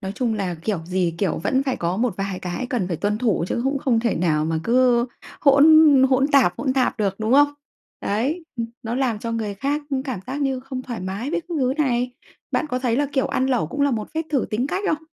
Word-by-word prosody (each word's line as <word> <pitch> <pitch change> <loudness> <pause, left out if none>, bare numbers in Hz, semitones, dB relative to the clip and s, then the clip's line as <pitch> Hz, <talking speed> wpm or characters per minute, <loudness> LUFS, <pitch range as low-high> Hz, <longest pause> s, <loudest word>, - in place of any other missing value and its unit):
nói 190 0 -5
chung 235 -2 -1
là 190 -4 -2
kiểu 170 +3 -3
gì 180 -1 -1
kiểu 195 -4 0
vẫn 260 +11 +1
phải 265 -2 -1
có 175 +2 -2
một 235 -3 0
vài 195 -1 -3
cái 185 +7 -4
cần 210 -8 -1
phải 170 - -2
tuân 210 +4 -1
thủ, 220 -8 +1
chứ - - -1
cũng 275 +1 0
không 250 -4 +1
thể 235 -1 0
nào 155 -3 +1
mà 160 0 -1
cứ 245 0 +3 0.3
hỗn 280 0 +6 0.5
hỗn 265 +1 +3
tạp 265 -12 +4
hỗn 260 -3 0
tạp 260 -1 0
được, 200 -3 0
đúng 220 +2 0
không? 290 +1 +5 0.5
Đấy, 275 - -1
ừm, 230 -1 -2 0.2
nó 230 0 -3
làm 250 -5 0
cho 230 +2 -4
người 220 -3 -3
khác 280 +8 -2 0.2
cảm 255 -9 -4
giác 270 +3 -4
như 270 -2 0
không 260 -1 -6
thoải 240 -3 -6
mái 195 +9 -4
với 350 - 0
các 345 0 -7
thứ 255 -1 +1
này. 250 -4 +1 0.4
Bạn - - 0
có 255 -3 -2
thấy 245 -2 0
là, 290 +2 +1
kiểu, 265 - +1
ăn 260 - 0
lẩu 250 -13 +1
cũng 285 - -5
là 285 - +3
một 220 -4 -3
phép 320 - 0
thử 275 -5 +1
tính 235 +5 0
cách 385 +7 -3
không? 315 -2 -1
245 Hz, 250 wpm, -22 LUFS, 200-270 Hz, 0.5 s, hỗn